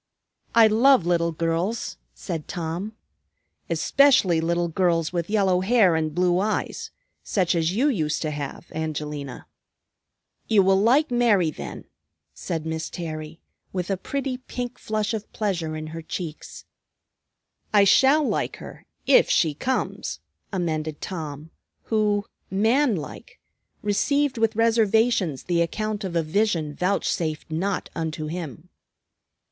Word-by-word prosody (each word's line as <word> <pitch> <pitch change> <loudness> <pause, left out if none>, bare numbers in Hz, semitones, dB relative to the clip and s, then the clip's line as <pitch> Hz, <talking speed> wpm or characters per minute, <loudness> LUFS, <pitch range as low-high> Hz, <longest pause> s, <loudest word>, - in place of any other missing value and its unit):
"I 230 -1 +8
love 225 -1 +5
little 170 -1 +2
girls," 165 +7 -2 0.2
said 145 - -5
Tom, 175 +5 -4 0.8
"especially 260 -12 +4
little 170 +1 0
girls 170 -1 +1
with 170 0 -2
yellow 195 -4 +3
hair 195 -4 +4
and 155 -1 -1
blue 180 0 +2
eyes, 215 +2 -2 0.3
such 185 -4 +1
as 170 +1 0
you 260 +7 +3
used 165 - 0
to 155 - -1
have, 145 +2 -6
Angelina." 150 -4 -5 1.0
"You 210 -3 +5
will 190 0 +4
like 265 +7 +3
Mary, 215 -9 +3
then," - - -8 0.5
said 165 -3 -4
Miss 160 0 -3
Terry, 155 -1 -6 0.3
with 180 0 -2
a - - +2
pretty 265 +6 -3
pink 250 -1 -6
flush 215 0 -2
of 215 -1 -5
pleasure 175 -7 -2
in 155 0 -5
her 165 - -5
cheeks. 160 -1 -7 1.1
"I 205 -2 +6
shall 270 +9 +5
like - - -1
her, - - -12 0.2
if - - +5
she 160 -3 +3
comes," 255 - -2 0.3
amended 160 -5 -2
Tom, 155 -3 -6 0.3
who, 210 -2 +1 0.2
man 225 +6 +2
like, 150 -4 -8 0.4
received 265 +6 +1
with 225 -1 +2
reservations 225 - +2
the 175 -1 +1
account 215 +4 -2
of 185 -3 -4
a 165 - +2
vision 165 -3 0
vouchsafed 165 -3 -1
not 185 +5 -2
unto 160 -1 -3
him. 165 +1 -6
180 Hz, 130 wpm, -24 LUFS, 160-220 Hz, 1.1 s, I